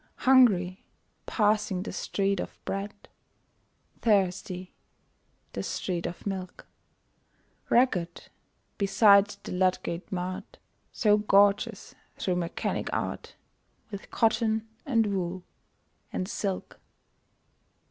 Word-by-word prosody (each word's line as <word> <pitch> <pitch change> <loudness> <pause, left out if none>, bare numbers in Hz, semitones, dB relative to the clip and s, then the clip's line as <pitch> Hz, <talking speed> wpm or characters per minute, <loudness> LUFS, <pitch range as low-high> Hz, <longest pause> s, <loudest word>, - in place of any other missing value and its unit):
Hungry 205 -9 +4 0.4
passing 210 -3 +1
the - - -5
Street 195 -1 -1
of - - -5
Bread; 200 +1 -5 0.9
Thirsty 185 -3 0 0.8
the - - -3
street 175 -3 -3
of 175 - -8
Milk; 190 -2 -5 1.0
Ragged 180 -9 +1 0.5
beside 200 0 +6 0.2
the - - -7
Ludgate 180 -1 -1
Mart, 185 0 -5 0.3
So 210 -2 +3
gorgeous, 205 -1 +2 0.2
through 180 -2 -1
Mechanic 170 -1 -2
Art, - - -4 0.6
With 200 -2 -8
cotton, 220 -1 +1 0.2
and 230 -5 +3
wool, 180 -1 -3 0.7
and 185 - -3
silk! 195 -2 -4
195 Hz, 90 wpm, -28 LUFS, 185-210 Hz, 1.0 s, beside